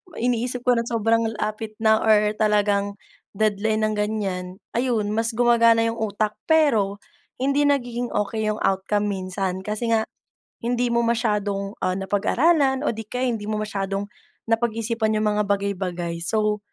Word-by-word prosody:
may 240 - -2
iniisip 245 +1 -2
ko 245 -2 +4
ng 235 - -3
sobrang 230 0 +2 0.2
lapit 215 0 -4
na 220 0 +5
or 210 -1 +4
talagang, 205 -1 +2 0.4
deadline 215 +1 0
ng 215 - -2
ganyan 210 -3 -2 0.3
ayun 235 -4 +1
mas 225 +1 +1
gumagana 230 -1 +4
yung 230 - -2
utak. 215 -1 -1
Pero, 225 -12 +2 0.4
hindi 280 +2 +2
nagiging 245 -4 0
okey 210 +1 -1
yung 215 - -4
outcome 205 +2 0
minsan 190 -1 -3
kasi 215 +3 -3
nga, 225 -1 +2 0.6
hindi 245 0 +1
mo 235 0 +2
masyadong, 210 -3 -1
ah, 185 - 0
napag-aralan 265 - +2
o - - +1
di 225 -1 -6
kaya 250 +3 -1
hindi 210 -3 -4
mo 215 - -2
masyadong 195 -1 -3 0.4
napag-isipan 225 -1 0
yung 215 0 +1
mga 210 0 +1
bagay-bagay 185 -4 -2
so 210 +1 +1
215 Hz, 150 wpm, -23 LUFS, 205-235 Hz, 0.6 s, na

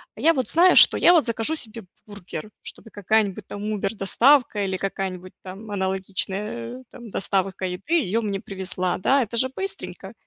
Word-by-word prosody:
я 330 - +3
вот 260 -5 -2
знаю, 355 +3 +5
что - - +8
я 350 - +6
вот 330 -4 +4
закажу 230 +5 -1
себе 225 -6 -8 0.2
бургер, 205 +1 -9
чтобы 225 - -11
какая-нибудь, 205 0 0
там, 205 - -7
убер 205 0 -2
доставка, 225 +2 +3
или 190 -1 -2
какая-нибудь, 185 -2 -5
там, 195 +3 -9
аналогичная, 190 - -3
э, - - -18
там, 240 -2 -11
доставка 195 -1 -2
еды, 180 - -4
её 230 - +1
мне 200 -3 -3
привезла, 185 -2 -3
да, 270 +7 +3
это 235 +1 -5
же 260 +3 +1
быстренько. 385 +9 -6
205 Hz, 170 wpm, -23 LUFS, 190-235 Hz, 0.2 s, что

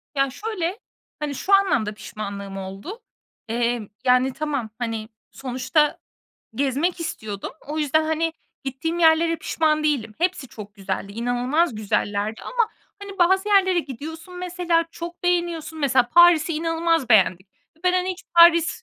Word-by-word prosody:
Ya, 275 0 +2
şöyle, 385 - -4 0.4
hani, 295 -2 -3
şu 395 - -1
anlamda 365 - +3
pişmanlığım 200 -2 -7
oldu. 195 - -7 0.5
Eee, 235 -2 -1 0.2
yani, 255 +1 +3
tamam, 285 -7 -3
hani, 225 -2 -3 0.2
sonuçta 270 +4 0 0.6
gezmek 285 +8 0
istiyordum. 215 -11 -5 0.2
O 305 +1 -3
yüzden, 310 +1 +2
hani, 320 +1 0 0.3
gittiğim 315 +6 -3
yerlere 330 0 +4
pişman 310 -1 0
değilim. 245 -8 0
Hepsi 345 -6 -1
çok 210 -2 -10
güzeldi. 195 0 -4
İnanılmaz 245 +7 0
güzellerdi 210 0 -1
ama, 475 -3 0 0.3
hani, 395 -1 -9
bazı 380 +3 +3
yerlere 380 -3 +4
gidiyorsun 320 +5 -7
mesela 355 -2 0
çok 340 +1 -8
beğeniyorsun. 345 -3 -1
Mesela, 260 -4 +2
Paris'i 340 +1 +6
inanılmaz 330 -2 0
beğendik 185 -2 +4 0.3
ve - - -28
ben, 365 - +4
hani, 365 0 +1
hiç 365 - -13 0.2
Paris, 335 -1 +6
305 Hz, 135 wpm, -23 LUFS, 240-345 Hz, 0.6 s, Paris'i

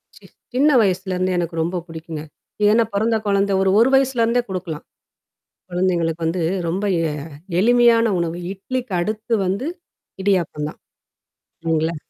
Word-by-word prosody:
C - - -17 0.3
சின்ன 275 +4 +4
வயசுலருந்தே 185 -2 0
எனக்கு 170 -1 -2
ரொம்ப 175 +2 -1
பிடிக்குங்க. 160 -2 -7 0.4
ஏன்னா 220 +3 +5
பிறந்த 220 +3 +1
குழந்த 200 0 +2
ஒரு, 190 - +3
ஒரு 235 +3 +5
வயசுலருந்தே 245 -3 +2
குடுக்கலாம். 180 -5 -5 0.9
குழந்தைங்களுக்கு 170 -2 0
வந்து 170 +2 -1 0.3
ரொம்ப 185 +5 -1 0.3
எ - - -3 0.5
எளிமையான 235 +1 +5
உணவு. 170 0 -2
இட்லிக்கு 240 +4 -5
அடுத்து 215 +5 -2
வந்து 200 +10 -1 0.5
இடியாப்பம் 175 -6 0
தான். - - -11 0.8
இல்லைங்களா? 165 0 0
190 Hz, 125 wpm, -21 LUFS, 170-230 Hz, 0.9 s, ஏன்னா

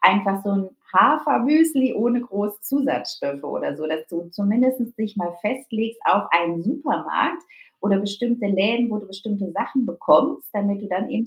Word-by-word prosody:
einfach 195 0 +4
so 205 - -1
'n 195 -1 0 0.3
Hafermüsli 295 -2 +4
ohne 240 +3 +1
groß 205 -2 -4
Zusatzstoffe 210 - -2
oder 140 - -4
so, 155 0 -5
dass 155 0 -4
du 170 0 -7
zumindest 240 +5 +1
dich 215 -1 -5
mal 175 -2 -4
festlegst 225 -1 -3
auf 205 - +4
einen 170 0 +2
Supermarkt 290 - -1 0.4
oder 200 -1 +2
bestimmte 205 +3 -2
Läden, 215 +5 +2
wo 215 - -2
du 205 - -10
bestimmte 195 0 -5
Sachen 260 +6 -1
bekommst, 255 - +2
damit 200 -1 -1
du 205 - -7
dann 195 +8 -2
eben 230 -2 -1
210 Hz, 160 wpm, -22 LUFS, 195-245 Hz, 0.4 s, einfach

